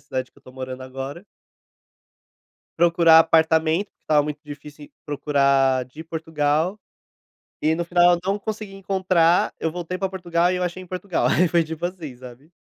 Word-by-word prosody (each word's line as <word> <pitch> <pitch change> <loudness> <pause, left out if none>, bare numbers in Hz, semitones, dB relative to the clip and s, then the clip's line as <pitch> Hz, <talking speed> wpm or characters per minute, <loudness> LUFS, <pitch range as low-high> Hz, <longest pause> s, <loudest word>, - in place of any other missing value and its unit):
cidade 130 -1 -5
que - - -22
eu - - -26
estou 130 - -16
morando 130 0 -7
agora 135 +7 -7 1.6
procurar 170 -1 +6
apartamento, 160 +3 +3
porque - - -53
estava 150 -1 +3
muito 150 0 -5
difícil 145 0 -11 0.2
procurar 140 -3 +2
de 130 +5 -12
Portugal, 160 +3 -1 0.8
e 155 +1 +3
no 170 +1 -1
final 175 0 +4
eu - - -2
não 195 +1 0
consegui 210 -1 -6
encontrar, 185 -3 +1
eu 160 - -1
voltei 180 +1 -5
para 195 0 -2
Portugal 175 -2 0
e - - -1
eu 180 - -2
achei 180 +1 -4
em 185 - -12
Portugal, 185 0 -1
aí 180 - +3
foi 170 0 +2
tipo 160 +2 -4
assim, 165 -8 -8
sabe? 125 +4 -13
160 Hz, 170 wpm, -22 LUFS, 145-180 Hz, 1.6 s, procurar